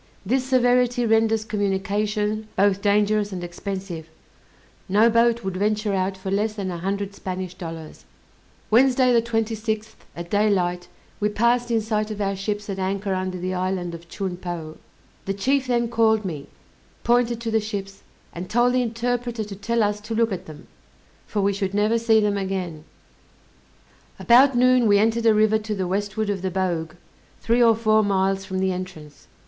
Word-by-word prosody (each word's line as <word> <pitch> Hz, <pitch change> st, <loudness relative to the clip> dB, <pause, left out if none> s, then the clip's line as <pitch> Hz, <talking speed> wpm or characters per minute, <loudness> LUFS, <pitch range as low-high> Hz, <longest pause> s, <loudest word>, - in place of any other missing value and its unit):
This 255 Hz, +6 st, +1 dB
severity 245 Hz, -1 st, +2 dB
renders 225 Hz, -1 st, +2 dB
communication 210 Hz, +1 st, -1 dB
both 200 Hz, 0 st, +2 dB
dangerous 210 Hz, 0 st, +2 dB
and 180 Hz, -2 st, -5 dB
expensive; 175 Hz, -2 st, -6 dB, 0.8 s
no 215 Hz, +4 st, +4 dB
boat 235 Hz, 0 st, +3 dB
would 190 Hz, -1 st, -3 dB
venture 210 Hz, +1 st, 0 dB
out 190 Hz, 0 st, -1 dB
for 190 Hz, 0 st, -5 dB
less 210 Hz, +2 st, 0 dB
than 195 Hz, -3 st, -3 dB
a 170 Hz, -, -5 dB
hundred 200 Hz, +2 st, -3 dB
Spanish 185 Hz, -2 st, -5 dB
dollars. 165 Hz, -3 st, -9 dB, 0.7 s
Wednesday, 255 Hz, +2 st, +4 dB
the 235 Hz, -, +4 dB
26th, 220 Hz, -1 st, -2 dB, 0.2 s
at 170 Hz, 0 st, -8 dB
daylight, 180 Hz, -4 st, +1 dB, 0.3 s
we 210 Hz, -, +1 dB
passed 240 Hz, +3 st, +1 dB
in 230 Hz, -1 st, +2 dB
sight 215 Hz, 0 st, -1 dB
of 215 Hz, -1 st, -6 dB
our 195 Hz, -1 st, -1 dB
ships 205 Hz, +1 st, -4 dB
at 195 Hz, -2 st, -4 dB
anchor 195 Hz, +1 st, -1 dB
under 185 Hz, 0 st, -3 dB
the 185 Hz, +1 st, -3 dB
island 180 Hz, -1 st, -2 dB
of 170 Hz, 0 st, -10 dB
Chun 190 Hz, -2 st, -4 dB
Po. 170 Hz, -3 st, -6 dB, 0.5 s
The 195 Hz, -, -2 dB
chief 260 Hz, +6 st, +1 dB
then 240 Hz, -1 st, +1 dB
called 220 Hz, -2 st, +2 dB
me, 150 Hz, -6 st, -5 dB, 0.6 s
pointed 240 Hz, -1 st, +2 dB
to 230 Hz, -1 st, -3 dB
the 220 Hz, 0 st, +2 dB
ships, 200 Hz, -2 st, -6 dB, 0.3 s
and 175 Hz, +2 st, -7 dB
told 240 Hz, +2 st, +3 dB
the 255 Hz, -, +2 dB
interpreter 240 Hz, 0 st, -2 dB
to 205 Hz, -1 st, -8 dB
tell 230 Hz, +3 st, 0 dB
us 210 Hz, 0 st, -1 dB
to 220 Hz, +2 st, -5 dB
look 230 Hz, 0 st, +2 dB
at 185 Hz, 0 st, -5 dB
them, 155 Hz, -1 st, -11 dB, 0.6 s
for 210 Hz, -, -1 dB
we 200 Hz, +1 st, +2 dB
should 195 Hz, 0 st, -3 dB
never 215 Hz, +3 st, +2 dB
see 225 Hz, -1 st, +4 dB
them 205 Hz, -1 st, +1 dB
again. 185 Hz, -5 st, -4 dB, 1.3 s
About 250 Hz, +2 st, +5 dB
noon 250 Hz, -1 st, +4 dB
we 205 Hz, -1 st, +5 dB
entered 225 Hz, +2 st, +2 dB
a 220 Hz, -, +6 dB
river 215 Hz, 0 st, +3 dB
to 215 Hz, 0 st, -4 dB
the 190 Hz, -2 st, -2 dB
westward 205 Hz, +3 st, -1 dB
of 195 Hz, -2 st, -3 dB
the 190 Hz, -, -1 dB
Bogue, 175 Hz, -4 st, -2 dB, 0.5 s
three 235 Hz, +2 st, +1 dB
or 230 Hz, -1 st, +6 dB
four 215 Hz, -1 st, +3 dB
miles 195 Hz, -1 st, 0 dB
from 190 Hz, -, -4 dB
the 190 Hz, 0 st, +1 dB
entrance. 180 Hz, -6 st, -8 dB
205 Hz, 175 wpm, -23 LUFS, 190-225 Hz, 1.3 s, a